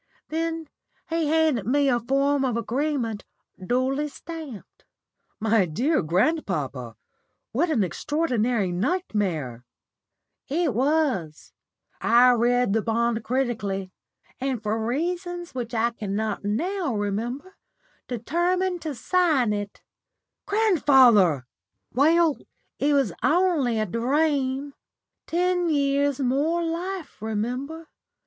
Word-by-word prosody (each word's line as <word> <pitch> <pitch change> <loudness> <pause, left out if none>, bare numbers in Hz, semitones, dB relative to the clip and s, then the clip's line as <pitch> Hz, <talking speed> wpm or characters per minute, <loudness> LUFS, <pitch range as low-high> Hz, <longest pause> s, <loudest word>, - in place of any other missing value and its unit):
Then 325 0 -2 0.4
he 330 -2 +1
handed 305 -9 +2
me 280 +3 +3
a 245 -2 +3
form 275 +3 +1
of 250 -3 0
agreement 240 -2 -2 0.4
duly 260 +7 0
stamped." 300 - -10 0.6
"My 220 -3 +2
dear 255 - +1
grandpapa, 155 - -1 0.6
what 320 +9 +1
an 255 -10 +2
extraordinary 235 - 0
nightmare!" 180 - -2 0.8
"It 305 -1 0
was. 255 - 0 0.5
I 245 +2 +6
read 245 -2 +2
the 225 - +2
bond 230 0 0
critically, 210 -7 -2 0.5
and, 255 -4 -2
for 220 +1 -1
reasons 350 +7 -3
which 240 -2 -4
I 230 +1 +2
cannot 215 -1 -3
now 310 - -1
remember, 235 - -3 0.5
determined 350 - -1
to 305 -3 -4
sign 290 - +2
it." 205 -1 -5 0.6
"Grandfather!" 260 - +4 0.5
"Well, 315 +3 +3 0.4
it 290 +1 +2
was 265 -11 +2
only 310 -8 +2
a 215 - +1
dream. 270 - 0 0.5
Ten 355 0 +1
years 280 -2 +1
more 285 +6 +1
life, 340 - -4
remember. 250 +9 -3
260 Hz, 100 wpm, -25 LUFS, 220-320 Hz, 0.8 s, I